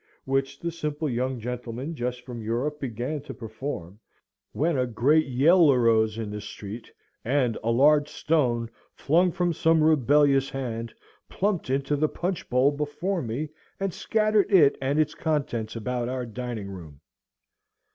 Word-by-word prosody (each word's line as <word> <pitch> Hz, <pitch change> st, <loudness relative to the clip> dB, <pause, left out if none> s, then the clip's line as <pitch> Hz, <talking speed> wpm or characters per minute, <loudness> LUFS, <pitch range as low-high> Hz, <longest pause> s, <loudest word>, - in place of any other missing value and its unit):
which 135 Hz, 0 st, -1 dB
the 170 Hz, -, -3 dB
simple 150 Hz, -1 st, -3 dB
young 130 Hz, 0 st, -1 dB
gentleman 125 Hz, +5 st, -5 dB
just 125 Hz, -3 st, -3 dB
from 120 Hz, -2 st, -8 dB
Europe 125 Hz, +7 st, -2 dB
began 130 Hz, +3 st, -3 dB
to 145 Hz, -, -9 dB
perform, 110 Hz, -5 st, -6 dB, 0.5 s
when 160 Hz, +2 st, 0 dB
a 125 Hz, -1 st, +1 dB
great 140 Hz, +7 st, +3 dB
yell 150 Hz, +5 st, +5 dB
arose 115 Hz, -3 st, +3 dB
in 110 Hz, -2 st, -4 dB
the 105 Hz, 0 st, -5 dB
street, 105 Hz, +2 st, -8 dB, 0.3 s
and 125 Hz, -2 st, +1 dB
a 115 Hz, -, 0 dB
large 145 Hz, +5 st, +4 dB
stone, 125 Hz, -8 st, 0 dB, 0.3 s
flung 175 Hz, +5 st, +2 dB
from 175 Hz, 0 st, 0 dB
some 160 Hz, 0 st, +3 dB
rebellious 145 Hz, -2 st, +4 dB
hand, 115 Hz, -4 st, -4 dB, 0.4 s
plumped 195 Hz, -7 st, -1 dB
into 135 Hz, +2 st, 0 dB
the 155 Hz, +1 st, +1 dB
punch 180 Hz, -1 st, -3 dB
bowl 125 Hz, +3 st, +4 dB
before 150 Hz, +6 st, -2 dB
me, 125 Hz, +6 st, -3 dB, 0.3 s
and 195 Hz, -2 st, -2 dB
scattered 215 Hz, -2 st, +1 dB
it 155 Hz, -8 st, +6 dB
and 135 Hz, +2 st, 0 dB
its 155 Hz, -1 st, +2 dB
contents 130 Hz, -9 st, -2 dB
about 120 Hz, +1 st, -2 dB
our 130 Hz, -1 st, -3 dB
dining 115 Hz, -3 st, -5 dB
room. 80 Hz, -7 st, -10 dB
135 Hz, 150 wpm, -26 LUFS, 120-155 Hz, 0.5 s, it